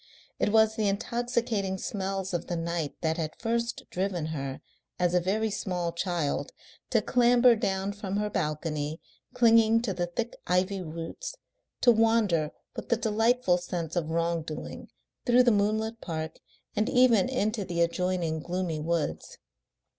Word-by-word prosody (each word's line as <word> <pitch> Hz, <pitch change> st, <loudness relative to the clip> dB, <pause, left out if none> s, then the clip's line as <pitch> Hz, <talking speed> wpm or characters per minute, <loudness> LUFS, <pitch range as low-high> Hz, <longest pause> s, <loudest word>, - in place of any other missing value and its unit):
It -, -, +2 dB
was 220 Hz, 0 st, +4 dB
the 215 Hz, -2 st, +1 dB
intoxicating 225 Hz, -2 st, -1 dB
smells 190 Hz, -1 st, -3 dB
of 175 Hz, 0 st, -2 dB
the 175 Hz, -, -2 dB
night 165 Hz, -2 st, -2 dB
that 160 Hz, -1 st, 0 dB
had 155 Hz, -2 st, -3 dB
first 235 Hz, 0 st, -1 dB
driven 185 Hz, -3 st, -1 dB
her, 135 Hz, -2 st, -4 dB, 0.4 s
as 175 Hz, -1 st, +1 dB
a 180 Hz, -, +5 dB
very 210 Hz, +5 st, 0 dB
small 180 Hz, -4 st, -2 dB
child, 170 Hz, -, -2 dB, 0.4 s
to -, -, +2 dB
clamber 245 Hz, 0 st, +5 dB
down 195 Hz, -2 st, -1 dB
from 200 Hz, -1 st, -4 dB
her 210 Hz, 0 st, 0 dB
balcony, 150 Hz, -3 st, -2 dB, 0.4 s
clinging 230 Hz, -1 st, +5 dB
to 210 Hz, -5 st, -1 dB
the 175 Hz, -1 st, -2 dB
thick 230 Hz, +7 st, -4 dB
ivy 185 Hz, +2 st, +1 dB
roots, 165 Hz, -, -6 dB, 0.5 s
to 240 Hz, -, +7 dB
wander 220 Hz, -9 st, +3 dB, 0.3 s
with -, -, -7 dB
the 235 Hz, -, +3 dB
delightful 225 Hz, -3 st, +2 dB
sense 175 Hz, -2 st, -4 dB
of 165 Hz, -3 st, -1 dB
wrong 170 Hz, 0 st, 0 dB
doing 155 Hz, -1 st, -7 dB, 0.4 s
through 245 Hz, +1 st, +6 dB
the 240 Hz, -, +5 dB
moonlit 220 Hz, +2 st, 0 dB
park 160 Hz, -2 st, -5 dB, 0.4 s
and 215 Hz, +3 st, +1 dB
even 250 Hz, -4 st, +4 dB
into 215 Hz, -4 st, 0 dB
the 170 Hz, -2 st, -2 dB
adjoining 170 Hz, -1 st, 0 dB
gloomy 175 Hz, -1 st, -2 dB
woods. 160 Hz, -, -2 dB
190 Hz, 150 wpm, -28 LUFS, 170-225 Hz, 0.5 s, to